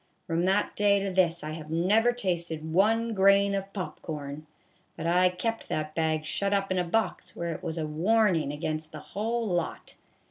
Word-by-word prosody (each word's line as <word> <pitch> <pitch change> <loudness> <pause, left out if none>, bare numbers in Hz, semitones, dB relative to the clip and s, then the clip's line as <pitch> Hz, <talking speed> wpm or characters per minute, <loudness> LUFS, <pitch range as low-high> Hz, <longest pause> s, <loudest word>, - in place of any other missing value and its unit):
From 170 0 0
that 195 +2 +1
day 205 -1 +4
to 195 0 -2
this 175 -3 +2
I 155 - -4
have 155 -1 -7
never 200 +9 +3
tasted 170 -8 -3
one 225 +5 +3
grain 200 0 +4
of 195 0 -3
pop 190 -3 -6
corn, 150 -1 -6 0.5
but 160 - -5
I 180 +2 +4
kept 225 +6 -3
that 155 0 -2
bag 155 -1 0
shut 200 +6 0
up 195 -1 -1
in 185 - +1
a - - +2
box 195 +3 -1
where 170 -1 -3
it - - -8
was 165 -2 -4
a 160 - -1
warnin' 170 -1 +2
against 155 +1 -4
the 155 - -8
whole 225 +3 -1
lot. 175 -3 -2
180 Hz, 190 wpm, -28 LUFS, 160-200 Hz, 0.5 s, day